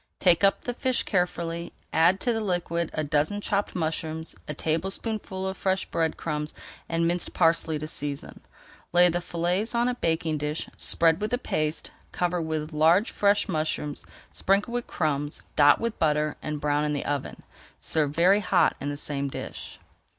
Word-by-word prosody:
Take 175 0 +4
up 195 - +4
the 245 - -2
fish 255 +1 0
carefully, 170 -2 -1 0.2
add 170 +4 +4
to 240 - +1
the 225 - -1
liquid 175 -4 -1
a 155 - -2
dozen 150 +7 +1
chopped 205 0 -1
mushrooms, 160 -1 -1
a 150 - -4
tablespoonful 190 +5 -2
of 190 - -3
fresh 190 -1 0
bread 160 -1 -1
crumbs 150 -1 -3 0.3
and 165 0 +1
minced 175 0 -2
parsley 165 -1 +3
to 155 +1 -5
season. 145 -2 -5 0.5
Lay 175 0 +7
the 175 +1 -1
fillets 180 +7 -1
on 235 +1 +2
a 250 - +1
baking 160 -7 -1
dish, 150 +2 -2
spread 165 +2 +2
with 210 - -1
the 245 - +1
paste, 155 -10 -2 0.2
cover 175 -1 0
with 160 0 -3
large 165 +7 +4
fresh 205 0 +2
mushrooms, 155 -3 -2 0.3
sprinkle 200 +5 +1
with 245 0 -2
crumbs, 145 -2 -2
dot 145 0 +6
with 230 -1 -3
butter, 150 -1 +1
and 150 -1 -3
brown 145 0 +1
in 150 0 0
the 145 - -3
oven. 145 -2 -3 0.4
Serve 155 -3 +1
very 180 +7 +4
hot 180 -4 +3
in 145 - -2
the 145 - -4
same 140 -1 -2
dish. 135 - -7
165 Hz, 170 wpm, -26 LUFS, 150-190 Hz, 0.5 s, Lay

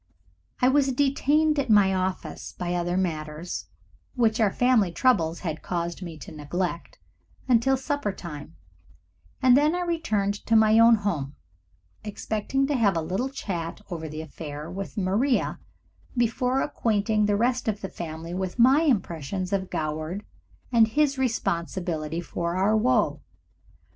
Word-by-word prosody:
I - - +7
was 270 0 +3
detained 290 +3 +2
at 265 -3 -1
my 205 -3 +5
office 185 0 -3
by 175 0 -3
other 175 +1 -1
matters, 160 -1 -3 0.5
which 230 -2 +2
our 215 -3 +3
family 245 -7 +3
troubles 170 -6 +2
had 160 -4 -4
caused 170 0 -3
me 170 -3 -7
to - - -10
neglect, 170 +3 -4 0.5
until 255 +2 +3
supper 285 -5 -2
time, 150 - -9 0.9
and 255 -1 +7
then 300 +4 +3
I 360 - -1
returned 215 - -1
to 230 - +3
my 220 0 +6
own 230 0 +7
home, 165 -10 -3 0.7
expecting 215 +5 -2
to 290 - -1
have 205 -8 +2
a - - 0
little 190 +11 -2
chat 175 -11 -5
over 160 -2 -4
the 155 +1 -6
affair 150 0 -7
with 195 +4 -6
Maria 210 +8 +1 0.6
before 250 +3 +1
acquainting 215 -1 +1
the 205 - +2
rest 245 +2 0
of 210 -1 -1
the 195 - -3
family 165 -1 -7
with 185 +2 -3
my 260 +5 +6
impressions 185 - -1
of 190 -1 -1
Goward 155 +6 -3 0.5
and 230 -2 +5
his 280 +3 +1
responsibility 170 -8 -2
for 170 0 -3
our 195 +4 +2
woe. 215 - +2
200 Hz, 145 wpm, -26 LUFS, 170-245 Hz, 0.9 s, I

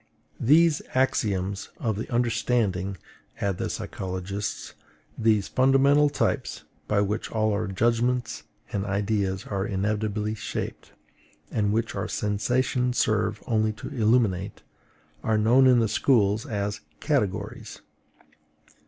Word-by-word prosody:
These 155 +4 +4
axioms 100 -7 0
of 110 -3 -1
the 110 - -6
understanding, 115 -5 0 0.4
add 100 -3 -1
the - - -2
psychologists, 95 +2 -4 0.4
these 110 -3 +2
fundamental 135 +3 +4
types, - - -1 0.2
by 105 -1 +2
which 105 +2 -2
all 110 -1 +1
our 105 +1 -1
judgments 120 +4 0 0.3
and 100 - -1
ideas 100 -1 -1
are 100 -2 -2
inevitably 105 +2 -1
shaped, 110 - -5 0.6
and 105 -2 +1
which 115 +2 -1
our - - -3
sensations 125 +4 0
serve 110 -1 +1
only 110 -1 +1
to 105 - -8
illuminate, 110 -6 +1 0.6
are 110 -1 +2
known 120 +5 +5
in 125 -1 +6
the 115 -1 +3
schools 110 0 +2
as 105 -3 -3 0.2
CATEGORIES. 130 -11 -2
110 Hz, 115 wpm, -26 LUFS, 100-120 Hz, 0.6 s, in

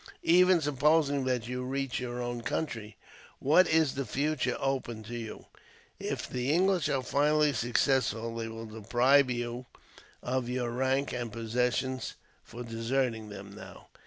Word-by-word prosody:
Even 180 0 +5
supposing 145 -1 +2
that 125 -3 -1
you 125 +1 -3
reach 135 0 -2
your 125 -1 -4
own 120 0 -3
country, 115 -6 -4 0.4
what 160 +7 +4
is 160 -3 +3
the 140 - -2
future 140 +4 -1
open 130 -5 -2
to 120 +3 -7
you? 115 -2 -7 0.5
If - - -3
the 125 +2 -1
English 180 -1 +2
are 135 -3 0
finally 150 +2 +2
successful, 115 -1 +1
they 115 -1 -3
will 115 0 -7
deprive 120 +5 +3
you 120 0 -3 0.6
of 125 -1 -1
your 125 -1 -1
rank 130 +3 0
and 120 -2 -3
possessions 125 +3 -1 0.3
for 120 +2 -8
deserting 115 -1 -1
them 100 -1 -9
now. - - -12
125 Hz, 145 wpm, -30 LUFS, 115-140 Hz, 0.6 s, Even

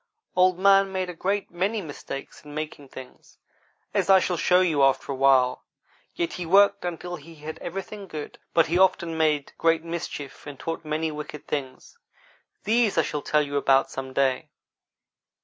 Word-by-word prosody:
Old 185 0 +4
man 195 0 +5
made 185 -1 -2
a - - -10
great 195 +4 -2
many 195 +6 -1
mistakes 145 -5 -8
in 150 0 -11
making 150 -2 -6
things, 130 -1 -13 0.6
as - - 0
I 190 -1 +8
shall 180 0 -1
show 180 +2 +3
you 160 -6 +2
after 135 +1 +2
a - - -2
while; 130 -1 +3 0.5
yet 170 - -2
he 180 - -4
worked 200 +2 +5
until 175 0 -4
he 165 +2 -14
had 155 +1 -8
everything 195 +3 -6
good. 155 -4 -7 0.2
But 165 - +5
he 170 +3 0
often 180 -3 +2
made 155 -3 +1
great 165 0 +2
mischief 165 -5 -6
and 145 -2 -9
taught 165 0 -4
many 155 +1 -2
wicked 150 0 -8
things. 130 -3 -5 0.6
These 225 -2 +2
I 165 - +5
shall 150 - -3
tell 150 +1 +2
you 145 0 -3
about 135 -1 +3
some 130 0 -6
day. 130 -1 0
165 Hz, 175 wpm, -25 LUFS, 145-185 Hz, 0.6 s, I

